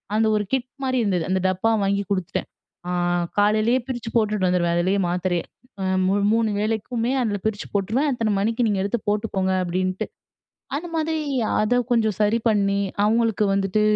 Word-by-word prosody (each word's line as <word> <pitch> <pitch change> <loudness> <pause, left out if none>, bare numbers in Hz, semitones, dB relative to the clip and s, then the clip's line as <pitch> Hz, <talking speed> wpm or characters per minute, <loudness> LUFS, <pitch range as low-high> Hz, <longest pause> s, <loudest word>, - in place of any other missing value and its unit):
அந்த 220 +1 +3
ஒரு 210 - +1
கிட் 255 -1 0
மாரி 260 -1 0
இருந்தது. 185 -5 0
அந்த 190 0 +2
டப்பா 185 +5 +1
வாங்கி 200 +1 +1
குடுத்துட்டேன். 185 -4 -2 0.4
ஆ - - -1 0.5
காலையிலயே 215 +4 +3
பிரிச்சு 240 -3 -4
போட்டுட்டு 210 -4 +2
வந்துருவேன். 175 -1 +1
அதிலயே 185 +3 +1
மாத்திரைய 180 0 0 0.7
மூ 190 - +2 0.2
3 225 -1 +2
வேளைக்குமே, 225 +3 -1
அதில 210 -4 0
பிரிச்சு 215 -1 -2
போட்டுருவேன். 215 +9 +1
"அத்தன 225 -4 0
மணிக்கு 230 +4 +1
நீங்க 205 -2 0
எடுத்து 205 +3 -1
போட்டுக்கோங்க" 205 -3 0
அப்படீன்ட்டு. 185 +1 -1 0.7
அந்த 325 +4 -4
மாரி 320 0 0 0.4
அத 215 +3 +2 0.2
கொஞ்சம் 220 -4 +2
சரி 210 +2 +3
பண்ணி 200 -2 +2 0.3
அவங்களுக்கு 225 -1 +2
வந்துட்டு, 195 +1 +1
210 Hz, 155 wpm, -23 LUFS, 190-230 Hz, 0.7 s, அந்த